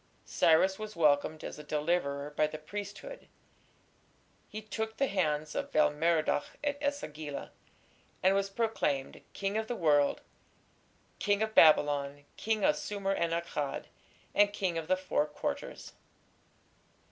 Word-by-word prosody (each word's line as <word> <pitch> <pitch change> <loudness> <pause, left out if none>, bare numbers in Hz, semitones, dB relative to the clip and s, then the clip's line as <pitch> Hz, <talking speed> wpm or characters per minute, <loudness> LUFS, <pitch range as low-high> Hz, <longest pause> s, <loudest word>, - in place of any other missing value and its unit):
Cyrus 185 +4 +3
was 215 -1 -6
welcomed 155 -1 +2
as - - -6
a - - -8
deliverer 150 -2 -1
by 155 - +3
the 155 - -7
priesthood. 205 - -8 1.2
He 215 - -6
"took 220 +1 -4
the 275 - +3
hands" 155 - -1
of - - -3
Bel 155 - +4
Merodach 155 -1 0
at 285 -1 -1
E - - -2
sagila, 155 - -5 0.7
and 190 +1 +5
was 195 0 +1
proclaimed 195 -11 -1
"King 200 +1 -2
of 220 - -4
the 245 - -2
world, 145 -6 +3 1.0
King 205 +1 +2
of 220 0 -3
Babylon, 145 -3 +4
King 220 -2 -1
of 150 - +3
Sumer 195 +4 -2
and 170 -3 0
Akkad, 165 -4 -2 0.5
and 205 0 +4
King 190 -4 -1
of 160 - -7
the 185 - +2
Four 185 -5 0
Quarters". 150 - -5
170 Hz, 140 wpm, -31 LUFS, 150-205 Hz, 1.2 s, and